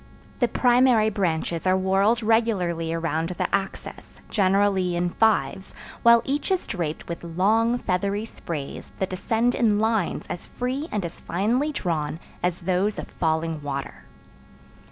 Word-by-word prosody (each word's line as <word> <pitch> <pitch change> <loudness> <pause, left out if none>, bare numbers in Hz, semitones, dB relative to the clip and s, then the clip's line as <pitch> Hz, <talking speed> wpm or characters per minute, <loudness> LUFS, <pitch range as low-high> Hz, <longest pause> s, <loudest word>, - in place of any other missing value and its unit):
The 245 - +3
primary 245 -3 +4
branches 170 -3 -1
are 185 0 +4
whorled 195 +5 +2
regularly 195 -8 +1
around 165 0 -1
the 180 - -2
axis, 195 -1 -4
generally 195 -2 +2
in 175 0 0
fives, 190 -5 +1 0.3
while 235 0 +6
each 285 +6 -1
is 375 -2 0
draped 165 -6 -4
with 170 0 -6
long, 215 +8 +2
feathery 200 0 -1
sprays 155 -10 -6
that 190 - -2
descend 225 +6 +1
in 225 -5 +2
lines 220 0 0
as 175 - -6
free 260 +5 -3
and 205 -4 -1
as 170 - -7
finely 235 - 0
drawn 160 - -2 0.2
as 180 0 -1
those 185 +4 0
of - - -6
falling 160 -1 -1
water. 140 -1 -5
195 Hz, 140 wpm, -24 LUFS, 170-225 Hz, 0.3 s, while